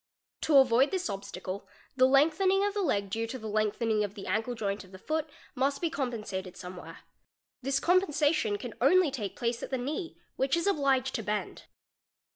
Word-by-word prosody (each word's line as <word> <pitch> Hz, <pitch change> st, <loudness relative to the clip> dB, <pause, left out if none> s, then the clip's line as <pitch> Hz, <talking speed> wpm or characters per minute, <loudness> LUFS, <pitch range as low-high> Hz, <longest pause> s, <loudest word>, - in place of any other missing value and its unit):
To 300 Hz, -3 st, +4 dB
avoid 265 Hz, 0 st, +5 dB
this 365 Hz, -, -2 dB
obstacle, 195 Hz, -1 st, -5 dB
© -, -, -30 dB, 0.3 s
the 255 Hz, 0 st, +5 dB
lengthening 330 Hz, +9 st, +4 dB
of 410 Hz, -, -1 dB
the 410 Hz, -, -1 dB
leg 200 Hz, -, 0 dB
due 225 Hz, +2 st, -1 dB
to 260 Hz, -, -5 dB
the 220 Hz, -, -10 dB
lengthening 215 Hz, +1 st, +1 dB
of 205 Hz, 0 st, -4 dB
the 195 Hz, -, -8 dB
ankle 220 Hz, +6 st, -1 dB
joint 205 Hz, -2 st, -2 dB
of 185 Hz, -, -17 dB
the 190 Hz, -, -10 dB
foot 310 Hz, +9 st, -2 dB, 0.2 s
must 275 Hz, +1 st, 0 dB
be 335 Hz, -2 st, -1 dB
compensated 210 Hz, -, -4 dB
somewhere. 180 Hz, 0 st, -9 dB, 0.6 s
This 275 Hz, +1 st, +1 dB
compensation 300 Hz, -, +2 dB
can 240 Hz, 0 st, -7 dB
only 340 Hz, +4 st, +5 dB
take 210 Hz, -8 st, -4 dB
place 235 Hz, 0 st, -2 dB
at -, -, -5 dB
the 265 Hz, -, -1 dB
knee, 305 Hz, +8 st, -4 dB, 0.2 s
which 270 Hz, +5 st, +2 dB
is 335 Hz, -, -1 dB
obliged 275 Hz, -8 st, +2 dB
to 230 Hz, -, -2 dB
bend. 210 Hz, 0 st, -3 dB
255 Hz, 190 wpm, -29 LUFS, 210-300 Hz, 0.6 s, avoid